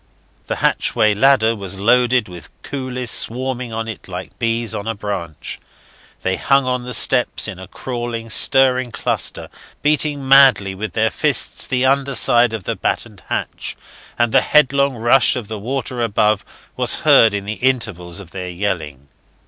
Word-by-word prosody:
The - - -2
hatchway 110 -1 +1
ladder 115 0 +3
was 100 -2 -5
loaded 120 +2 +2
with 90 -4 -11
coolies 130 -3 -4
swarming 125 0 -1
on 115 0 -4
it 110 -4 -8
like 90 0 -8
bees 115 -1 -1
on 100 - -5
a 115 - -2
branch. 95 -7 -6 0.6
They 95 0 -1
hung 135 -1 +2
on 125 -1 -2
the 125 - -5
steps 125 -2 +3
in 95 - -7
a 95 - -10
crawling, 120 0 -5
stirring 130 -2 +3
cluster, - - -2 0.4
beating 150 -2 0
madly 130 -8 +5
with 105 +3 -6
their 110 0 +1
fists 150 -3 0
the 130 -1 0
underside 130 -3 +3
of 110 -4 -5
the - - -3
battened - - -3
hatch, - - -4 0.4
and 120 -1 +1
the 135 - +4
headlong 140 -2 +2
rush 120 +2 +3
of 120 -5 -5
the 110 -1 -5
water 125 +2 -4
above 105 -2 +1 0.3
was - - +2
heard 110 -2 +6
in 100 -1 -4
the 105 - -3
intervals 105 -9 -1
of 90 -4 -12
their 90 -1 -6
yelling. 85 -7 -4
115 Hz, 160 wpm, -18 LUFS, 100-130 Hz, 0.6 s, heard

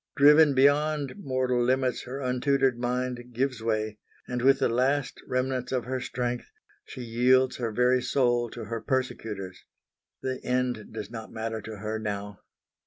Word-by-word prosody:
Driven 150 0 +7
beyond 145 +1 +3
mortal 130 -6 0
limits 130 0 +1
her 130 +3 -5
untutored 130 0 +2
mind 125 0 -1
gives 130 -1 -1
way; 110 -1 -1 0.3
and 125 -1 -2
with 135 +2 +5
the - - +2
last 130 +4 0
remnants 130 0 -1
of 125 -3 -1
her 130 +1 -2
strength 125 0 -3 0.3
she - - -9
yields 125 +3 +3
her 115 -3 -2
very 125 +3 +3
soul 120 -2 +1
to - - -7
her 115 +1 -4
persecutors. 110 -8 -3 0.6
The 130 -1 -2
end 125 -3 -1
does 110 -1 -6
not 110 -2 -7
matter 110 0 -4
to 110 +1 -8
her 110 +2 -3
now. 105 -1 -4
125 Hz, 155 wpm, -27 LUFS, 115-130 Hz, 0.6 s, Driven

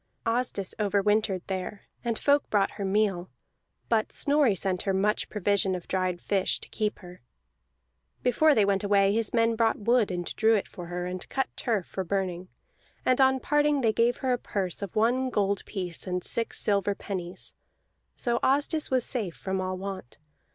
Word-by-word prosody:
Asdis 230 -4 0
over 205 -1 +2
wintered 205 -2 +1
there, 190 +1 -4 0.2
and 230 -2 -1
folk 285 0 +2
brought 200 -2 +2
her 200 - -6
meal; 195 -2 0 0.6
but 220 -2 +1
Snorri 285 -7 +3
sent 185 -1 0
her 195 -1 0
much 210 +2 +1
provision 200 -2 +1
and 180 - -7
dried 185 -2 -1
fish, 195 0 0
to - - -10
keep 215 -1 -2
her. 180 -3 -12 1.0
Before 290 +5 +4
they 210 - +4
went 200 0 +1
away 200 -1 +3
his 225 -1 0
men 230 -1 +2
bought 225 0 +2
wood 230 +1 +2
and 175 -1 -3
drew 225 0 +4
it 205 - -1
for 175 -3 -9
her, 175 0 -4
and 180 0 -6
cut 265 - -1
turf 215 -7 -1
for 190 - -4
burning; 185 -1 -2 0.6
and 255 +1 +3
on 265 0 +4
parting 295 0 +2
they 225 -3 +2
gave 235 +2 +2
her 255 - +3
a 245 - -1
purse 190 -5 -3
of 200 -3 -6
one 245 +4 +2
gold 200 -4 0
piece 180 -3 -4
and 180 -1 -2
six 230 -1 0
silver 200 -1 +1
pennies, 185 -4 -5 0.6
so 240 -2 0
Asdis 290 +3 +1
was 255 -2 +2
safe 210 -10 -2
from 190 0 -3
all 185 0 -3
want. 190 -9 -7
205 Hz, 180 wpm, -27 LUFS, 190-235 Hz, 1.0 s, Before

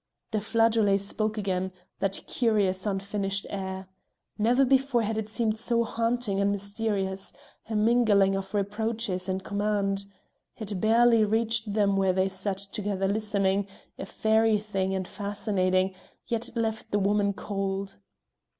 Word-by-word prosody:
The 215 -1 0
flageolet 220 -2 +3
spoke 215 +2 -2
again 190 -2 -1 0.3
that 195 0 -1
curious 205 -5 +1
unfinished 200 0 -1
air. 190 -1 -4 0.5
Never 240 +5 +3
before 265 -2 +3
had 220 +1 -1
it 220 -1 -3
seemed 220 -1 -1
so 235 0 +1
haunting 230 -3 -1
and 200 0 +2
mysterious; 200 -1 -2 0.4
a 220 - -2
mingling 210 -3 +4
of 195 +2 -4
reproaches 205 -2 -1
and 190 0 -2
command. 200 -1 -1 0.5
It 205 -4 -4
barely 230 +1 +5
reached 220 0 +1
them 200 -1 +2
where 190 -1 +3
they 190 +1 +2
sat 190 +1 -3
together 200 -1 -2
listening, 200 -1 0 0.3
a - - -5
fairy 220 0 +3
thing 195 -2 -2
and 185 -1 -3
fascinating, 195 -2 0 0.3
yet 230 -1 -2
it 235 - -9
left 220 -1 -2
the 205 - +1
woman 200 0 +2
cold. 195 - -3
205 Hz, 140 wpm, -27 LUFS, 195-220 Hz, 0.5 s, barely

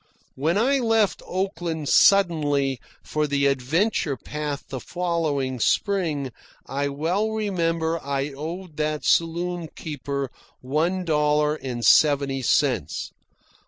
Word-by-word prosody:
(When 160 +7 0
I 270 +6 +3
left 225 -4 +2
Oakland 175 -5 -3
suddenly 145 -10 +4 0.2
for 150 0 -1
the 140 -1 +1
adventure 140 - +1
path 150 -1 -5
the 130 - -4
following 155 -7 -2
spring, 155 - 0 0.3
I 140 +1 -2
well 165 +10 0
remember 170 -6 -1
I 140 0 -1
owed 160 +3 -7
that 150 0 -1
saloon 170 +1 +1
keeper 140 -3 -4 0.3
one 165 +8 -1
dollar 150 -1 +2
and 125 -6 -4
seventy 140 0 +4
cents. 120 - 0
150 Hz, 110 wpm, -24 LUFS, 140-175 Hz, 0.3 s, suddenly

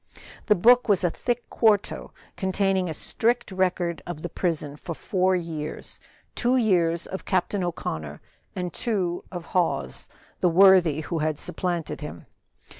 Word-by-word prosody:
The 210 - +5
book 245 +6 +5
was 195 -3 +3
a 175 - +2
thick 240 -1 -2
quarto, 215 -3 +1 0.2
containing 190 -1 0
a - - -2
strict 235 +5 0
record 180 -2 0
of 165 -3 -6
the 175 - -3
prison 155 -5 -2
for 165 +2 -7
four 185 0 +1
years; 160 -4 -4 0.3
two 245 +2 +2
years 170 -7 +2
of 190 - -6
Captain 185 +1 0
O'Connor, 80 - -4 0.4
and 180 -2 -3
two 185 -7 -1
of 175 -3 -6
Hawes, 115 - -1 0.3
the 180 - +3
worthy 175 -4 +6
who 165 +1 -3
had 155 -1 0
supplanted 175 -5 -3
him. 150 - -8
180 Hz, 145 wpm, -25 LUFS, 165-195 Hz, 0.4 s, worthy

